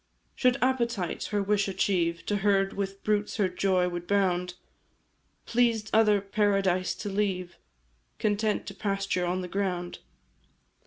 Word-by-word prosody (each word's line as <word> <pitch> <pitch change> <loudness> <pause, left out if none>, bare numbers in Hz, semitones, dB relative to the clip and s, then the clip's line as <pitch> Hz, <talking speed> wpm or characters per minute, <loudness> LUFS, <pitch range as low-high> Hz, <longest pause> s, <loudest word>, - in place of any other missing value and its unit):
"Should 250 0 +2
appetite 235 -8 0
her 205 -1 -1
wish 205 0 +1
achieve, 175 -3 0
To 205 - 0
herd 195 -1 +2
with 195 0 -4
brutes 210 -1 0
her 200 - +3
joy 185 0 +1
would 175 -1 -5
bound; 180 -3 +1 0.9
Pleased 230 -3 +1
other 215 -2 +5
paradise 195 -2 +1
to 210 - -5
leave, 190 -3 -2 0.6
Content 210 0 0
to - - -7
pasture 195 -3 -1
on 180 +1 -1
the 180 - -5
ground. 180 -2 -3
195 Hz, 135 wpm, -28 LUFS, 180-210 Hz, 0.9 s, other